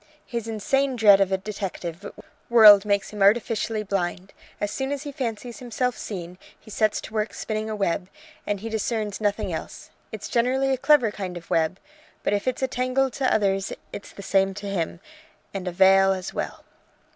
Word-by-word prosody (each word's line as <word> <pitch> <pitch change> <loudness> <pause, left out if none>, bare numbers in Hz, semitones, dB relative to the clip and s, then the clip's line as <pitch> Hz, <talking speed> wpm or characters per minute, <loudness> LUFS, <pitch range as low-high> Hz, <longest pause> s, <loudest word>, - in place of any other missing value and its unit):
His 235 -2 -4
insane 265 +5 0
dread 205 -4 +6
of 195 -1 +2
a 190 - +2
detective 195 -2 -6 0.4
world 215 -4 +9
makes 200 -1 0
him 210 -1 -7
artificially 215 +1 +2
blind. 190 -1 -3 0.3
As 205 - -2
soon 265 +3 -3
as 285 0 -3
he 290 - -6
fancies 240 -4 -5
himself 250 0 -2
seen, 180 -3 -7 0.2
he 215 - -15
sets 215 0 +1
to - - -10
work 215 -1 -2
spinning 215 0 -3
a 215 - -3
web, 190 -2 -1 0.4
and 205 -2 -1
he 225 - -5
discerns 220 -1 -2
nothing 205 -1 -1
else. - - -7 0.2
It's - - -6
generally 260 +3 +1
a - - 0
clever 255 -4 +4
kind 185 -4 -5
of 170 - -12
web; 165 +3 +1 0.4
but - - +1
if 205 +4 -1
it's 255 +1 -1
a - - +3
tangle 255 +1 0
to 265 +2 0
others 195 -2 +1 0.2
it's 200 - -8
the 200 - -10
same 195 0 +2
to 205 - -7
him, 175 -3 -3 0.5
and 190 -2 -5
a - - -1
veil 195 +1 +5
as 185 0 -5
well. - - -5
210 Hz, 190 wpm, -24 LUFS, 195-235 Hz, 0.5 s, world